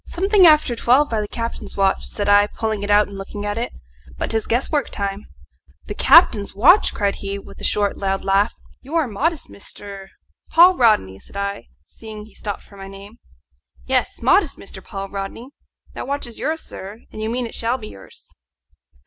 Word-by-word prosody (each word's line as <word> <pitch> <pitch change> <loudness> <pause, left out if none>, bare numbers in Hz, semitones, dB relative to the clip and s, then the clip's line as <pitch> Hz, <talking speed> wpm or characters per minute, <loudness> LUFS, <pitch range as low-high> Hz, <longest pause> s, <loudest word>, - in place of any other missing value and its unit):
"Something 385 +1 +4
after 305 -6 +4
twelve 255 +5 +3
by 220 -2 0
the 210 - -4
captain's 230 +1 -6
watch," 195 -1 +1
said 205 -1 -2
I, 205 0 +5
pulling 220 -1 -3
it 205 - -4
out 205 0 +5
and 200 -1 -9
looking 205 +1 -6
at 205 0 -2
it. 240 - -3 0.5
"But - - -3
'tis 220 -1 -1
guesswork 270 +5 0
time." 200 0 -4 0.6
"The - - -5
captain's 215 - +5
watch?" 325 - +5
cried 200 -2 -1
he, 200 0 -4
with 200 0 -12
a - - -8
short 205 -1 0
loud 195 -1 -1
laugh. 195 +3 +2 0.3
"You 285 +5 -7
are 320 -4 +2
modest, 295 +9 -1
Mr. 200 -1 -9 0.2
" - - -43
"Paul 355 +3 +7
Rodney," 210 - +2
said 200 - -13
I, 200 0 -4 0.2
seeing 215 -2 -10
he 215 - -18
stopped 205 -2 -6
for 200 - -17
my 195 0 -9
name. 200 +4 -12 0.7
"Yes, - - -1
modest, - - +3
Mr. - - -11
Paul 195 0 -6
Rodney. 200 +6 -6 0.4
That - - -6
watch 285 +1 -3
is 235 -2 -10
yours, 320 +3 -2
sir; 200 +4 -9
and 215 - -8
you 220 - -2
mean 245 +1 -2
it 230 - -8
shall 235 +3 -1
be 215 -4 -9
yours." 95 - -13
210 Hz, 195 wpm, -21 LUFS, 200-250 Hz, 0.7 s, Paul